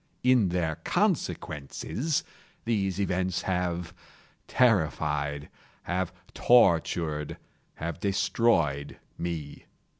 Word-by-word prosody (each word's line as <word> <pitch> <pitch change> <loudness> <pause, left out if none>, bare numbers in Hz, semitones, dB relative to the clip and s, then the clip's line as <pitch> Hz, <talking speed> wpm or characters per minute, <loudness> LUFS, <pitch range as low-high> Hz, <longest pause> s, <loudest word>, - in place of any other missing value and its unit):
In 125 -6 +4
their 85 -3 -1
consequences, 110 - -1 0.4
these 100 -5 0
events 95 -2 0
have 90 -2 -2 0.5
terrified—have 80 - 0 0.2
tortured—have 85 -6 +1
destroyed 85 -8 +1 0.2
me. 80 -4 -5
90 Hz, 60 wpm, -28 LUFS, 75-100 Hz, 0.5 s, In